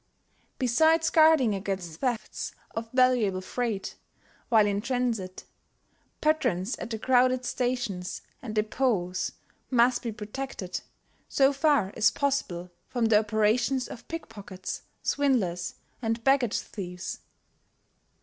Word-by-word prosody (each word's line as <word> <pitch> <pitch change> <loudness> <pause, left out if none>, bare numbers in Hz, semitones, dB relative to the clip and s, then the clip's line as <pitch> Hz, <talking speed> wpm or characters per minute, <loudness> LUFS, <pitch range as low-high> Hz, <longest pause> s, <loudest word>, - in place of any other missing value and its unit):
Besides 315 +6 +3
guarding 310 -8 +5
against 190 -5 -4
thefts 240 -5 -2 0.2
of 225 0 -5
valuable 250 -7 +3
freight 220 +1 -3 0.5
while 220 -3 +6
in 200 0 0
transit, 235 -6 -2 0.8
patrons 250 - +1
at - - -5
the 225 - -3
crowded 255 +1 +3
stations 245 -9 -2 0.2
and 220 -3 -6
depots 210 -5 0 0.4
must 245 -1 +4
be 235 - -3
protected 210 -3 -5 0.5
so 275 0 +4
far 275 -8 +2
as 215 - +5
possible 185 -11 -1 0.2
from 240 -2 0
the 220 -2 +5
operations 220 +4 +1
of 235 - -10
pickpockets, 205 - -6 0.2
swindlers 205 -12 +1 0.3
and 225 0 -1
baggage 265 -4 +3
thieves. 180 -3 -6
230 Hz, 110 wpm, -28 LUFS, 200-255 Hz, 0.8 s, while